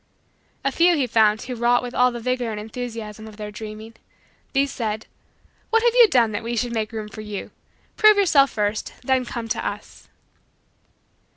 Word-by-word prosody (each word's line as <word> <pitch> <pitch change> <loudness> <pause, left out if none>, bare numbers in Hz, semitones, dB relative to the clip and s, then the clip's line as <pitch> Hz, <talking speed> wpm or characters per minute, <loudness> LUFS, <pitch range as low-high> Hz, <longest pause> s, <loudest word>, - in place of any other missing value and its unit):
A 275 - +2
few 345 +5 +4
he 280 -4 +1
found 220 -2 +3
who 255 - -5
wrought 240 +1 +2
with 245 0 -6
all 250 0 +3
the 240 - -6
vigor 250 0 -1
and 215 -1 -4
enthusiasm 220 -1 -7
of 215 -1 -12
their 210 -1 -6
dreaming. 215 +1 -9 0.6
These 275 0 +1
said: 220 -2 -3 0.6
"What 455 0 +3
have 475 -1 +4
you 485 -2 +8
done 240 - +3
that 205 - -3
we 235 +1 -3
should 235 +1 -1
make 220 -1 -2
room 220 -2 -5
for 215 +1 -9
you? 210 -2 -6 0.5
Prove 430 -1 +6
yourself 310 -9 +5
first 210 0 -2
then 260 0 +1
come 235 -1 -5
to - - -2
us." - - -7
235 Hz, 185 wpm, -23 LUFS, 215-260 Hz, 0.6 s, you